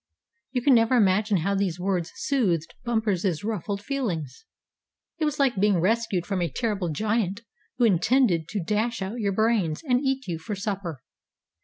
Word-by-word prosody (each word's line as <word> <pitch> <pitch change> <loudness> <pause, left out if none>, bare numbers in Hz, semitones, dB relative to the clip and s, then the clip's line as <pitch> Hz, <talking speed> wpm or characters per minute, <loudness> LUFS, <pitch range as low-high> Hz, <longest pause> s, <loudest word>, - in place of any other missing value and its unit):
You 250 -2 -1
can 275 - +5
never 230 +1 +4
imagine 210 -1 +3
how 200 - +1
these 190 -3 -1
words 180 -2 -1
soothed 190 - 0
Bumper's 205 -8 0
ruffled 205 -1 -3
feelings. 210 - -3 0.7
It 315 - +1
was 300 -1 -1
like 265 -8 +2
being 200 -2 +3
rescued 200 -1 +1
from 195 -2 -2
a 170 - 0
terrible 205 - -2
giant 210 +3 -1 0.4
who 245 - +4
intended 195 - +3
to 200 -2 -3
dash 215 +3 -1
out 210 +6 -5
your 200 -3 0
brains 210 -7 +1
and 250 -4 +2
eat 270 -3 -1
you 165 -3 -3
for 205 +6 -5
supper. 190 - -4
205 Hz, 165 wpm, -26 LUFS, 180-235 Hz, 0.7 s, can